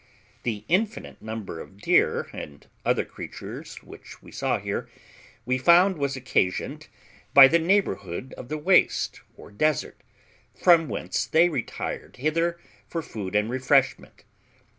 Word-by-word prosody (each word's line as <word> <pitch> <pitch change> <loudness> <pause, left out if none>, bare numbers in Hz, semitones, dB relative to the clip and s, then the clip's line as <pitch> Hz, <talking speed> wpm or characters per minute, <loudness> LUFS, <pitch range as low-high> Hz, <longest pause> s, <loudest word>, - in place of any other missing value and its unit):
The 110 -3 -4
infinite 210 +5 -1
number 110 -6 -6
of 95 - -11
deer 105 - +2
and 70 -1 -9 0.2
other - - +1
creatures - - -9
which - - -13
we - - -15
saw - - -1
here, - - -4 0.6
we 130 +2 0
found 175 +4 +5
was 140 -1 -1
occasioned 120 -8 -1 0.5
by 135 -1 +11
the 170 +5 +3
neighbourhood 130 - -1
of 120 - -10
the 155 - -2
waste 175 +4 +2 0.2
or - - -13
desert, 155 +8 -1 0.5
from 170 -3 +4
whence - - -2
they 165 +2 +4
retired 160 - -5
hither 165 +5 0 0.3
for 165 -1 -4
food 105 -9 -6
and 105 +1 +2
refreshment. 130 +1 +1
140 Hz, 135 wpm, -25 LUFS, 110-170 Hz, 0.6 s, by